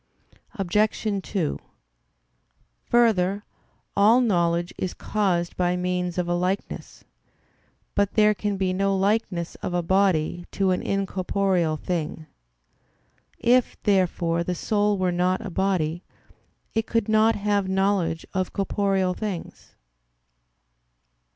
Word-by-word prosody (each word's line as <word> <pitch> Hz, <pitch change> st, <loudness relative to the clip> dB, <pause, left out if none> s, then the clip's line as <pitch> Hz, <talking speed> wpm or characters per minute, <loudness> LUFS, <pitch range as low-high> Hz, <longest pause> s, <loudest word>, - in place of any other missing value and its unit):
Obj. 210 Hz, +3 st, 0 dB
2: 180 Hz, -6 st, -2 dB, 1.3 s
Further, 205 Hz, -4 st, +2 dB, 0.5 s
all 215 Hz, +5 st, +5 dB
knowledge 175 Hz, -6 st, +1 dB
is 185 Hz, -, -4 dB
caused 180 Hz, -5 st, -1 dB
by 180 Hz, 0 st, +1 dB
means 180 Hz, -1 st, -2 dB
of 180 Hz, -1 st, 0 dB
a 175 Hz, -, 0 dB
likeness. 180 Hz, +3 st, -3 dB, 0.9 s
But 200 Hz, -1 st, 0 dB
there 210 Hz, -1 st, +5 dB
can 205 Hz, 0 st, -2 dB
be 185 Hz, -1 st, 0 dB
no 195 Hz, +1 st, +1 dB
likeness 190 Hz, -4 st, 0 dB
of 175 Hz, -, -3 dB
a 175 Hz, -, 0 dB
body 175 Hz, -2 st, +1 dB
to 195 Hz, -1 st, +1 dB
an 180 Hz, -, 0 dB
incorporeal 190 Hz, -3 st, 0 dB
thing. 160 Hz, -2 st, -3 dB, 1.1 s
If, 245 Hz, +1 st, +2 dB
therefore, 175 Hz, -4 st, +1 dB
the 180 Hz, +1 st, -2 dB
soul 205 Hz, +2 st, +1 dB
were 185 Hz, -1 st, +1 dB
not 180 Hz, +4 st, 0 dB
a 195 Hz, -, -5 dB
body, 175 Hz, -2 st, 0 dB, 0.7 s
it 225 Hz, 0 st, -1 dB
could 230 Hz, -3 st, 0 dB
not 220 Hz, +1 st, +4 dB
have 205 Hz, -1 st, 0 dB
knowledge 190 Hz, -4 st, 0 dB
of 185 Hz, -1 st, -2 dB
corporeal 195 Hz, -2 st, 0 dB
things. 200 Hz, -4 st, -6 dB
190 Hz, 115 wpm, -24 LUFS, 175-205 Hz, 1.3 s, all